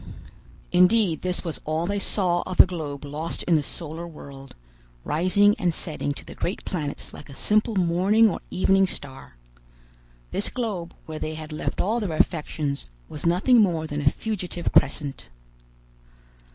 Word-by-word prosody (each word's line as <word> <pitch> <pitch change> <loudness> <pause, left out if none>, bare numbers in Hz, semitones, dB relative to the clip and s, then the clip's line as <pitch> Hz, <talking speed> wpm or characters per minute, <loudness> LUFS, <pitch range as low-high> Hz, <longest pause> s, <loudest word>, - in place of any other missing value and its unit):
Indeed 180 -1 +4
this 180 0 -1
was 165 - -3
all 155 +2 -1
they 200 +2 -1
saw 180 -3 +1
of 185 - -5
the - - +10
globe 155 -6 -5
lost 150 +4 -4
in 175 - +1
the 155 - +4
solar 165 +3 -6
world, 140 -4 -11 0.5
rising 195 +6 +3
and 180 -4 +2
setting 155 -3 -3
to - - -10
the - - -9
great 180 - -4
planets 150 -6 -4
like 145 - -11
a 140 - -10
simple 215 - +2
morning 190 +5 +4
or 200 - -1
evening 195 +1 +3
star! 135 - -9 1.0
This 200 - 0
globe, 205 -9 -4
where 155 -1 -6
they 155 0 -3
had 155 0 -8
left 150 - -3
all 220 +5 +1
their 200 -7 -2
affections, 150 - -1 0.2
was 150 +2 -4
nothing 210 +8 +5
more 170 -6 +1
than 150 -1 -3
a 145 - +5
fugitive 180 -3 -3
crescent! 140 - +1
170 Hz, 160 wpm, -25 LUFS, 155-195 Hz, 1.0 s, the